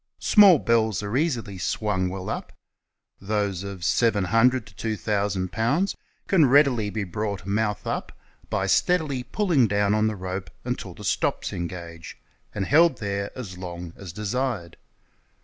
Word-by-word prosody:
Small 200 -5 +7
bells 110 -5 +1
are 100 +3 -3
easily 120 - -1
swung 95 +1 -1
well 95 0 -6
up. - - -4 0.7
Those 100 -2 -1
of 100 -3 -7
700 115 +5 +3
to - - -16
2,000 100 -4 -1
lbs. 135 - 0 0.3
can 165 -7 +4
readily 130 -6 +4
Ije 105 0 -3
l)rought 100 -3 -3
AIOUTH 105 0 -1
UP - - -3 0.4
l)y - - 0
steadily 155 -8 +1
pulling 145 - +2
down 100 0 +1
on 110 0 +2
the 110 - -2
rope 95 0 -5 0.2
until - - -4
the - - -11
"STOPS" - - -1
engage, 85 -2 -7 0.4
and 100 - -1
held 160 - +4
there 100 -1 -3
as 95 -8 -7
long 85 -2 -7
as 95 -4 -9
desired. 105 -2 -3
105 Hz, 145 wpm, -25 LUFS, 95-125 Hz, 0.7 s, Small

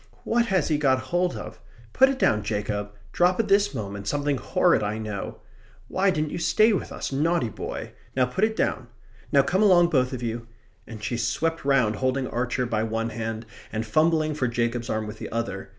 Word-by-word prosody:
"What 235 0 +1
has 190 -7 +1
he 150 -2 +1
got 135 -3 +3 0.2
hold 180 0 +1
of? 110 +1 -8 0.3
Put 265 - +6
it 275 - -1
down, 105 - +2
Jacob! 105 -1 -2 0.2
Drop 180 - +2
it 220 -2 0
this 200 -2 +4
moment! 100 -3 -5
Something 145 +1 0
horrid, 180 - +2
I 105 +1 -2
know. 105 -3 -5 0.5
Why 195 +1 +2
didn't 155 -4 -1
you - - -3
stay 215 +6 +4
with 195 - -2
us? - - -4
Naughty 145 -3 +1
little - - -17
boy! - - -6 0.2
Now 130 -1 +4
put 180 +11 -2
it 220 0 +2
down. - - -1 0.4
Now 140 -3 +5
come 185 +6 +1
along 175 -5 +6
both 130 -4 +2
of 125 -2 -5
you," 115 0 -4 0.4
and 110 -2 -9
she 120 +2 -2
swept 165 +7 -1
round, 130 -6 +2
holding 130 0 0
Archer 125 +1 -1
by 110 -3 -1
one 115 +1 -1
hand 115 0 -4 0.3
and 110 +1 -2
fumbling 155 +5 +2
for 135 -4 0
Jacob's 120 0 -1
arm 110 0 -1
with 105 - -8
the - - -6
other. 110 -4 -3
130 Hz, 205 wpm, -25 LUFS, 110-170 Hz, 0.5 s, Put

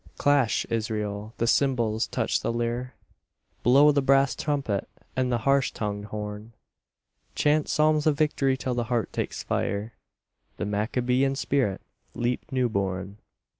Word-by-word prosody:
Clash, 140 -6 +2
Israel, 110 -1 -3
the 115 - 0
cymbals, 115 -4 +1
touch - - -1
the - - -1
lyre, 120 +2 -2 0.7
Blow 140 +5 +6
the 140 -1 +2
brass 135 0 +4
trumpet 140 -10 -2 0.3
and 130 -1 0
the 120 - +2
harsh 135 +3 +2
tongued 105 -1 -4
horn; 105 +1 -6 0.8
Chant 150 0 +2
psalms 155 0 +3
of 150 -2 +3
victory 140 -3 +1
till 130 -1 -2
the 120 -1 -1
heart 115 -3 -1
takes - - -3
fire, 105 +3 -2 0.6
The - - -2
Maccabean 125 +6 0
spirit 130 -8 0 0.3
leap 120 +1 -2
new 130 -2 +2
born. 95 -1 -3
120 Hz, 135 wpm, -26 LUFS, 105-135 Hz, 0.8 s, Blow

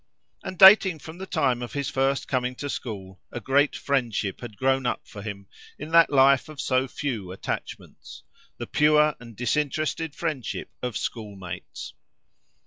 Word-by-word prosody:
And, 185 - -6
dating 190 -2 +8
from 160 +3 -11
the 190 - -6
time 125 -7 0
of 120 - -6
his 140 -1 -2
first 135 +1 0
coming 125 -1 -1
to 145 +2 -5
school, 95 -5 -7
a - - -5
great 140 +5 +2
friendship 120 -8 -1
had 120 -4 -9
grown 130 -1 +1
up - - -3
for 100 - -10
him, 100 -2 -7 0.3
in 150 +3 -8
that 165 0 +6
life 140 0 +4
of 155 -2 -11
so 130 0 +1
few 115 -10 -4
attachments—the 95 - -8
pure 150 0 +3
and 115 -2 -12
disinterested 150 +5 -1
friendship 150 -9 -4
of 125 -3 -3
schoolmates. 95 -6 -7
135 Hz, 150 wpm, -25 LUFS, 115-150 Hz, 0.3 s, dating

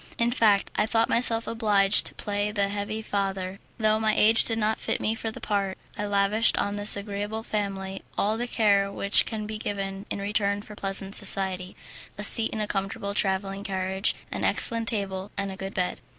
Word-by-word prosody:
In 235 0 +1
fact 215 -5 +2
I 210 - 0
thought 225 0 +1
myself 230 -1 +2
obliged 205 -3 +2
to - - -6
play 205 0 -3
the 200 -1 -1
heavy 205 +2 -5
father, 195 -2 -4 0.2
though 215 -1 +1
my 220 -1 0
age 225 +1 +4
did 225 - -1
not 215 0 -1
fit - - -2
me 215 - -1
for 225 0 -5
the 220 - -9
part, 200 -2 -2 0.2
and 210 - -4
I - - -5
lavished 205 +3 +2
on 205 0 -2
this 205 0 +7
agreeable 205 +2 -5
family 195 -3 -4 0.2
all 210 +2 0
the 240 +2 -4
care 200 -4 +1
which 200 +1 +2
can 215 -2 -4
be 215 0 -6
given 195 -1 -5
in - - -3
return 200 0 -2
for 215 - -12
pleasant 195 0 -2
society, 185 -1 +5 0.4
a 210 - -5
seat 225 +2 +7
in 220 - -6
a - - -1
comfortable 200 0 -4
travelling 195 0 -2
carriage, 190 +1 -1 0.2
an - - -4
excellent 230 -1 +1
table, 195 -3 -3
and 200 -1 -3
a - - -8
good 195 0 -8
bed. 180 -1 -2
205 Hz, 200 wpm, -25 LUFS, 195-215 Hz, 0.4 s, this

